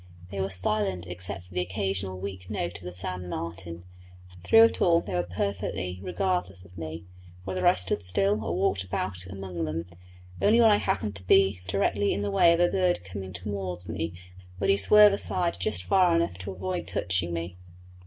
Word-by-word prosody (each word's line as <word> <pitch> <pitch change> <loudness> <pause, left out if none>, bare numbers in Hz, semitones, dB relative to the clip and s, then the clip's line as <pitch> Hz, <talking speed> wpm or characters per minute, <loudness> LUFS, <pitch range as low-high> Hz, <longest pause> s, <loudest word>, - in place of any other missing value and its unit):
They 100 -1 -3
were 95 - -1
silent 95 -1 -1
except 90 +2 -5
for 90 0 -17
the 90 - 0
occasional 95 +1 -2
weak 95 -1 -7
note 85 0 -3
of 90 - -14
the 90 - -5
sand 90 0 -5
martin; 85 0 -6 0.5
and 90 -1 -17
through 225 - +7
it 230 - +3
all 170 -2 +5
they 100 - -6
were 90 - +2
perfectly 90 0 -3
regardless 90 0 -2
of 90 +1 -17
me, 80 0 -7 0.4
whether 95 -1 0
I - - +6
stood 95 +3 -2
still 100 +3 +1
or 85 -3 -2
walked 95 +1 +1
about 90 0 -4
among 95 -3 -5
them; 80 +2 -3 0.6
only 220 +3 +5
when 225 -2 +7
I 205 - +5
happened 110 - -1
to 90 -1 -12
be 95 -1 +4
directly 100 +1 +1
in 100 - -2
the 100 - -1
way 170 +12 +5
of 170 - +2
a 175 - +5
bird 180 - +1
coming 95 0 -7
towards 90 -1 -5
me 80 0 -2
he 85 - -12 0.4
would 100 +2 +3
swerve 210 - +7
aside 180 - -1
just 90 -1 -1
far 180 - +4
enough 170 - +1
to 95 +2 -5
avoid 95 0 -4
touching 90 -1 -1
me. 85 +1 -4
95 Hz, 195 wpm, -27 LUFS, 90-100 Hz, 0.6 s, through